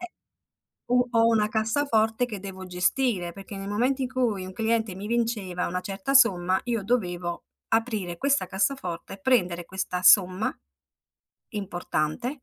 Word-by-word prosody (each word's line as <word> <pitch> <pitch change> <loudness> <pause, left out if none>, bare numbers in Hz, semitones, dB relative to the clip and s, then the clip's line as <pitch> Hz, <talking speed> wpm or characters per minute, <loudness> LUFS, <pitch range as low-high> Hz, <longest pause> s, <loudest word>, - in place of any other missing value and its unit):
Eh, 360 0 -7 0.8
u 250 0 +3
ho 230 -1 +4
una 220 -2 +3
cassaforte 220 0 +1
che 215 -5 -6
devo 190 -1 -8
gestire, 180 +1 0
perché 195 +1 -9
nel 195 +1 -6
momento 255 +6 +1
in 255 - 0
cui 225 -8 0
un 185 - -8
cliente 225 -3 0
mi 200 +2 -6
vinceva 220 -6 -1
una 180 +1 -3
certa 195 +8 -3
somma 190 -7 +5
io 230 -4 -1
dovevo 180 -6 -2 0.2
aprire 215 -7 -1
questa 280 -5 +1
cassaforte 190 -3 -2
e - - -9
prendere 180 -8 +1
questa 185 0 -3
somma 185 +1 +5 1.0
importante, 200 - -3
210 Hz, 145 wpm, -26 LUFS, 185-240 Hz, 1.0 s, somma